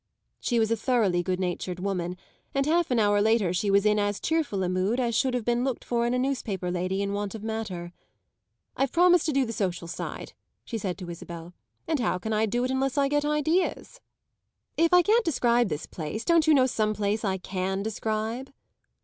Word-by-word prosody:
she 240 - 0
was 225 -1 +2
a - - +4
thoroughly 220 -7 +1
good 185 +1 -2
natured 180 0 -3
woman, 180 -2 -2 0.4
and 275 0 +2
half 335 +3 +2
an 250 - +1
hour 205 -2 +3
later 215 -4 +2
she 200 +3 0
was 200 +1 +4
in 210 0 +3
as 205 0 0
cheerful 310 -12 0
a - - 0
mood 185 +7 0
as 240 -2 0
should 255 +2 +1
have 240 -3 -2
been 240 0 +1
looked 265 -3 -2
for 235 -1 0
in 240 - 0
a - - +1
newspaper 225 -9 -2
lady 185 +2 -1
in 200 0 -2
want 205 +1 -3
of 215 - -8
matter. 205 -6 -4 0.8
"I've 270 -1 0
promised 350 -1 +4
to - - +2
do 275 -2 +2
the 230 - -5
social 180 -5 -2
side," - - -6 0.3
she 230 - -4
said 190 -3 -3
to 180 -3 -8
Isabel; 170 0 -9 0.3
"and 315 -3 0
how 225 -6 0
can 220 +5 -3
I 215 +1 +2
do 240 +4 0
it 255 - -1
unless 265 +1 0
I 280 -1 +3
get 290 0 +1
ideas? 315 - 0 0.8
If 330 0 +3
I 360 0 +6
can't 450 +6 +3
describe 240 - +2
this 150 0 -3
place 170 +8 -5
don't 335 -2 +4
you 310 - +6
know 260 -2 +5
some 215 -4 0
place 210 +2 -1
I 190 -2 0
can 190 +1 -3
describe?" 220 +4 -3
220 Hz, 215 wpm, -27 LUFS, 190-265 Hz, 0.8 s, I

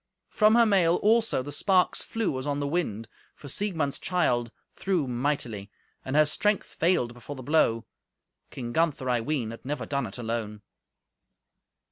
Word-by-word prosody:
From 215 0 +4
her 235 -1 +6
mail, 185 -5 +3
also, 220 - +3
the 145 - -7
sparks 185 +4 +2
flew 215 -12 -2
as 130 - -6
on 145 0 -1
the 145 - -1
wind, 115 -9 -2 0.3
for 145 - -12
Siegmund's 160 -4 -1
child 125 -10 +1 0.3
threw 185 -6 0
mightily; 120 -5 -2 0.3
and 130 - -4
her 155 0 +6
strength 210 +7 0
failed 160 -9 0
before 120 +4 -9
the 130 - -9
blow. 120 -6 +2 0.6
King 120 -2 -6
Gunther, 160 -5 0
I 120 -1 +1
ween, 125 -4 -2
had 115 - -10
never 135 -2 -4
done 140 +2 -2
it - - -9
alone. 110 -3 -4
145 Hz, 160 wpm, -27 LUFS, 120-175 Hz, 0.6 s, her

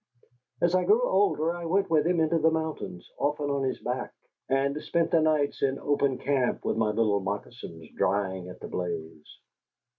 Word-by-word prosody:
As 175 0 +3
I 185 - +3
grew 450 +4 +4
older 175 - +2
I 175 -1 -6
went 190 +2 +1
with 155 0 +3
him 175 -1 +2
into 160 +1 +2
the 160 +1 +4
mountains, 160 - -4
often 145 0 0
on 140 -1 0
his 130 -1 -1
back; 125 +1 -3 0.4
and 135 +1 +1
spent 170 -1 0
the 165 - +4
nights 155 -2 +1
in 135 0 +1
open 140 -2 +1
camp 135 -3 0
with - - 0
my 110 -1 +1
little 105 -1 +2
moccasins 95 -4 -6
drying 95 -2 0
at 90 - -10
the - - -6
blaze. 80 -3 -5
140 Hz, 180 wpm, -27 LUFS, 105-160 Hz, 0.4 s, grew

